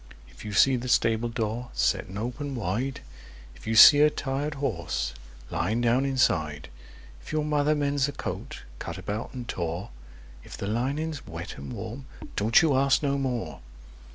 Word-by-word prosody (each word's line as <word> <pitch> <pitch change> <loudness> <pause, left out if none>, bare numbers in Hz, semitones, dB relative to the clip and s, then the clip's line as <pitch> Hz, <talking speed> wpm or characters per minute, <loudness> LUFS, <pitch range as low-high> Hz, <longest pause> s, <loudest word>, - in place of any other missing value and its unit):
If - - -14
you 105 - -6
see 130 +7 +4
the 125 +1 -5
stableyard 115 0 0
setting 95 - 0
open 125 +5 -4
wide; 120 +5 -2 0.5
If 70 - -14
you 110 - 0
see 145 +5 +10
a 150 - +7
tired 145 +1 -3
horse 100 - -2 0.4
lying 110 +7 0
down 120 +3 +2
inside; 80 - 0 0.5
If - - -10
your 155 -1 0
mother 150 0 +2
mends 145 -2 +1
a - - -3
coat 140 - -6 0.2
cut 85 - -6
about 100 +4 -4
and 125 -2 -6
tore; 85 - -4 0.5
If - - -10
the - - -4
lining's 140 +8 -2
wet - - -7
and 70 -1 -7
warm—don't 115 - -1
you 150 -4 +3
ask 135 +2 +3
no 140 -1 +1
more! 125 -4 -3
125 Hz, 155 wpm, -27 LUFS, 105-140 Hz, 0.5 s, see